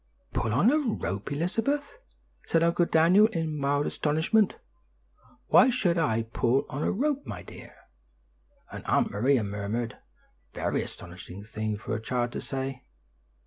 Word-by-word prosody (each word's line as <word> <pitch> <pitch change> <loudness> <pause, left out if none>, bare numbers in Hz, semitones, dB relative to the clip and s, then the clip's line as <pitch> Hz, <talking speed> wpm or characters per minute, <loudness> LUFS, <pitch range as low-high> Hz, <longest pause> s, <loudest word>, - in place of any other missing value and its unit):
"Pull 110 - 0
on 145 - +4
a 305 - +3
rope, 120 - -3
Elizabeth!" 225 - -1 0.5
said 165 0 +3
Uncle 170 +1 +2
Daniel 180 +7 +5
in 165 -7 -3
mild 145 0 +1
astonishment. 160 +8 +1 0.9
"Why 255 +2 +7
should 195 -9 +1
I 115 -8 +1
pull 120 +3 +1
on 140 - -4
a - - +1
rope, 285 +5 -1
my - - -6
dear?" - - -12 1.0
and - - -7
Aunt - - +2
Maria 120 +4 +2
murmured, 105 +3 -3 0.5
"Very - - -1
astonishing 90 +2 -9
thing 110 0 -3
for - - -5
a 110 - -2
child 120 +1 -1
to - - -5
say." 135 -1 -4
145 Hz, 145 wpm, -28 LUFS, 115-190 Hz, 1.0 s, Why